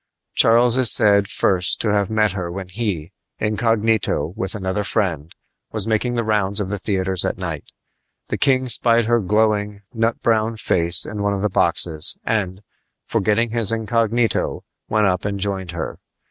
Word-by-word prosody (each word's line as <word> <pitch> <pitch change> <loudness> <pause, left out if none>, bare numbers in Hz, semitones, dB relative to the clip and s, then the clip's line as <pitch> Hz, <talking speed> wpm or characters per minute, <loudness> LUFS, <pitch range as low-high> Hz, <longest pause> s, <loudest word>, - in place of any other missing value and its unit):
Charles 120 +2 +4
is 130 -4 +5
said 100 -3 +4
first 90 -3 0
to 105 -2 0
have 100 -2 0
met 110 -2 +1
her 90 -3 -5
when 95 0 -7
he, 90 -6 -4 0.3
incognito, 110 -6 0
with 95 -4 -4
another 95 +1 -2
friend, 85 -8 -2 0.4
was 110 -3 +3
making 115 +2 -1
the 115 - 0
rounds 105 -2 +2
of 100 -2 -3
the 105 0 -4
theaters 95 -2 0
at - - -2
night. - - -5 0.6
The - - -2
king 130 -2 +2
spied 115 -1 +3
her 120 +1 +2
glowing, 105 0 0
nut 115 0 -1
brown 115 0 +1
face 85 -4 0
in 105 -1 -6
one 100 0 0
of 100 - -4
the 105 - +1
boxes, 80 -4 +1
and, 100 -3 -2 0.4
forgetting 110 +1 0
his 115 -3 +2
incognito, 115 0 0 0.3
went 110 0 +2
up 90 -1 0
and 100 -1 -3
joined 95 -2 -3
her. 85 -2 -6
105 Hz, 165 wpm, -20 LUFS, 95-115 Hz, 0.6 s, is